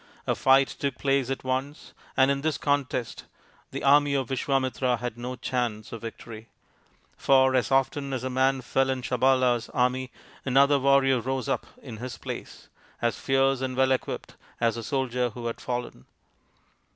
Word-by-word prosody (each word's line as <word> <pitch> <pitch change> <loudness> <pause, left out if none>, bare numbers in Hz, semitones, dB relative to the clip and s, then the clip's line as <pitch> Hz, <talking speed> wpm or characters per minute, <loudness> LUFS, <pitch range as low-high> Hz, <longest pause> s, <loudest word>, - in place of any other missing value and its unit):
A - - +1
fight 135 0 +4
took 140 +2 -4
place 135 -2 +1
at 135 - -3
once, 130 +3 -3 0.2
and 130 +1 +5
in 140 0 -1
this 155 0 0
contest 140 -4 -1 0.4
the - - -6
army 145 0 +5
of 135 -3 -1
Visvamitra 130 -1 0
had 120 -1 -4
no 125 +2 -5
chance 120 -4 -3
of 115 - -7
victory; 115 -1 -9 0.7
for 130 -1 +4
as 130 0 +1
often 135 +1 +1
as 130 -2 -3
a - - -1
man 130 +1 +2
fell 135 +2 +1
in 130 -1 -2
Sabala's 125 -2 +2
army 125 +1 +1 0.3
another 140 +2 +4
warrior 135 -1 +4
rose 130 +2 -2
up 135 - -1 0.2
in 120 -5 -8
his 125 +1 -6
place, - - -8 0.3
as 120 -1 0
fierce 135 -1 +2
and 130 -1 -3
well 130 0 +3
equipped 130 - -2 0.3
as 115 -1 +2
the 115 - -5
soldier 125 0 -1
who 120 +1 -8
had 115 - -4
fallen. 120 - -5
130 Hz, 165 wpm, -26 LUFS, 125-135 Hz, 0.7 s, and